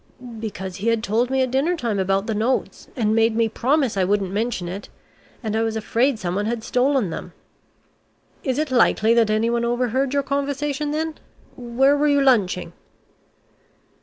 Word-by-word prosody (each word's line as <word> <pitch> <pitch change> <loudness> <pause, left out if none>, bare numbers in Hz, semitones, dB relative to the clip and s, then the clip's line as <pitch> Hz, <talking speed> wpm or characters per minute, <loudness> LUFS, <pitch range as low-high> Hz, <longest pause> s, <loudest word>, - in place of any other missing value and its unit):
"Because 190 -4 -6
he 205 - -4
had 230 -1 +1
told 235 +3 +1
me 265 0 +2
at 255 - -2
dinner 300 +7 +1
time 230 -8 -2
about 195 +1 +1
the 220 - -2
notes, 225 +5 -1
and 220 -5 +1
made 225 0 +3
me 230 0 +2
promise 260 +2 0
I 190 - +1
wouldn't 195 0 0
mention 210 -3 -2
it, 190 +4 -7 0.5
and 220 -1 -2
I 220 - +1
was 225 -1 -1
afraid 235 +4 +1
someone 195 +2 -2
had 230 -1 -2
stolen 250 - +1
them." - - -7 1.1
"Is 260 -3 -1
it 305 -2 -1
likely 230 -2 +4
that 230 -2 +3
anyone 230 +2 +1
overheard 250 +2 0
your 280 - +2
conversation 285 +1 -2
then? 310 +1 -3 0.4
Where 255 +3 +2
were 295 +1 +2
you 285 -1 +3
lunching?" 200 -10 +2
235 Hz, 170 wpm, -22 LUFS, 215-270 Hz, 1.1 s, likely